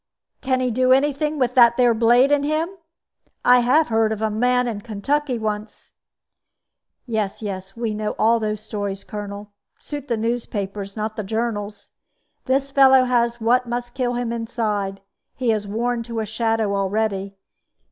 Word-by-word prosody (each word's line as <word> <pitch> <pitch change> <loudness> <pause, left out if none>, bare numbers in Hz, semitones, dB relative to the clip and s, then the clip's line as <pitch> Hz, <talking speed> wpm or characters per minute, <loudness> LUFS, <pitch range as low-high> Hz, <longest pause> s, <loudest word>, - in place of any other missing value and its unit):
"Can 260 -1 0
he 250 -1 0
do 255 +2 +2
any 280 +3 +4
thing 300 +2 -2
with 250 -3 +1
that 235 -2 +6
there 245 -2 +4
blade 240 +4 +4
in 290 -1 +3
him? 310 +3 0 0.8
I 250 0 +7
have 260 +6 +3
heard 225 -1 +2
of 220 - -3
a 220 0 0
man 250 +3 +2
in 215 -3 -4
Kentucky 250 +5 -1
once 215 -1 -5 0.6
" - - -60 0.2
"Yes, 220 -3 -3
yes; 195 0 -6
we 230 -2 -2
know 210 0 -3
all 230 +1 +3
those 215 -1 -2
stories, 205 -2 -4
Colonel 205 0 -7 0.3
suit 290 -2 -7
the 235 - 0
newspapers, 210 -3 -3
not 215 0 -3
the 215 - -2
journals. 210 -1 -4 0.5
This 275 +1 0
fellow 265 -1 +6
has 240 -1 +1
what 240 +2 +2
must 240 0 -4
kill 250 -2 -1
him 240 -1 -2
inside; 215 -4 -2 0.3
he 250 -3 +1
is 210 -2 -1
worn 235 +3 -1
to 230 -1 -5
a 220 - -1
shadow 225 -1 0
already. 200 0 -1
230 Hz, 165 wpm, -22 LUFS, 210-250 Hz, 0.8 s, I